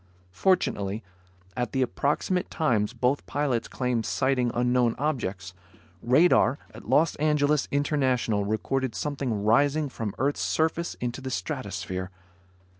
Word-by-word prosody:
Fortunately, 105 - 0 0.5
at 120 -3 -2
the 130 - +2
approximate 150 +8 -1
times 115 -10 +1
both 130 +3 0
pilots 140 -5 -1
claimed 125 -3 -1
sighting 130 -2 +1
unknown 125 -1 +2
objects, 100 -11 -2 0.5
radar 135 +1 +4 0.2
at - - -11
Los 165 +2 +4
Angeles 150 -1 +2
International 130 -7 +1
recorded 115 +4 -1
something 135 -8 -2
rising 145 +6 +3
from 110 -5 -5
earth's 140 +3 0
surface 160 +2 0
into 120 +1 -4
the 130 - -5
stratosphere. 95 - -4
130 Hz, 115 wpm, -26 LUFS, 115-145 Hz, 0.5 s, radar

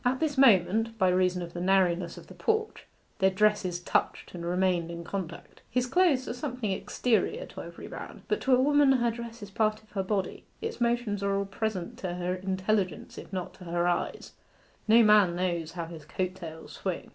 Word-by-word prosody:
At 255 +1 +1
this 305 -3 0
moment, 225 -2 +4
by 190 -3 +3
reason 180 0 +2
of 170 - -8
the 175 - -4
narrowness 180 -2 +2
of - - -10
the - - -13
porch, 440 0 -1 0.3
their 190 - +5
dresses 190 -2 +1
touched, 175 - -1
and 175 -1 -6
remained 175 -1 +1
in 170 0 -6
contact. 170 -2 -6
His 250 0 +1
clothes 290 -3 +3
are - - -2
something 245 -5 -3
exterior 250 - 0
to - - -9
every - - -9
man; - - -9
but 425 - 0
to 260 -1 +4
a - - +2
woman 285 0 +5
her 240 -2 +2
dress 235 -1 -8
is 200 - -9
part 215 +1 0
of 215 - -26
her 195 - -1
body. 190 0 -2 0.2
Its 450 - -5
motions 235 -4 0
are 200 0 +1
all 200 - -1
present 195 -2 -3
to 180 -2 -3
her 180 0 -1
intelligence 190 -1 -1
if - - -11
not 185 -2 -4
to 180 - -13
her 175 +1 0
eyes; 175 - -2 0.6
no 230 +2 +7
man 210 -5 +5
knows 170 -3 -2
how 170 -1 -4
his 165 -2 -10
coat 185 +4 -3
tails 160 -3 -9
swing. - - -4
195 Hz, 205 wpm, -28 LUFS, 180-235 Hz, 0.6 s, no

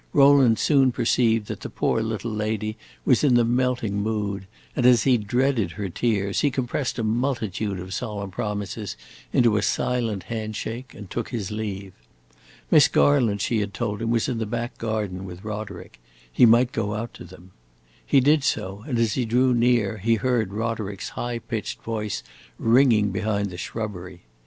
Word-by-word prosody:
Rowland 140 -5 +6
soon 135 -4 +4
perceived 115 -2 +2
that - - -6
the - - -7
poor 115 - 0
little 110 +1 -3
lady 110 0 -2 0.3
was - - +4
in 135 -4 +4
the 120 -1 +4
melting 120 -4 0
mood, 100 -2 -2 0.3
and, 125 - 0
as 120 -2 +6
he 130 -2 +4
dreaded 120 -2 0
her 100 -2 -4
tears, 100 0 0
he 145 - +3
compressed 130 0 -2
a 115 - -1
multitude 110 -4 -1
of 95 +1 -7
solemn 100 -1 -4
promises 105 0 -4 0.3
into 115 -4 +3
a - - +1
silent 110 -1 -1
hand 110 0 -4
shake 120 +5 -6
and 105 -4 -10
took 120 - -3
his 110 -4 -4
leave. 100 -3 -5 0.8
Miss - - +7
Garland, 100 +9 +3
she 115 +1 +1
had 100 -2 -3
told 105 +1 -2
him, 115 - -1
was 115 -1 +1
in 120 -3 -2
the 110 - -2
back 120 +2 -3
garden 105 -5 -3
with 90 -1 -9
Roderick: 105 - -7 0.3
he 120 - +6
might 120 +2 +5
go 105 -4 -2
out 115 +2 -5
to - - -10
them. 90 +4 -14 0.5
He 140 - +4
did 145 +2 +4
so, 100 -6 -2
and 125 -5 -1
as 115 -3 +2
he 130 - 0
drew 125 +3 +2
near 120 -3 +2
he 115 +4 +2
heard 115 -3 0
Roderick's 105 -2 -3
high 120 -1 -4
pitched 115 -1 -5
voice 105 -3 -3 0.3
ringing 115 -3 +4
behind 100 0 -1
the 90 - -8
shrubbery. 90 -3 -6
110 Hz, 175 wpm, -24 LUFS, 100-120 Hz, 0.8 s, Miss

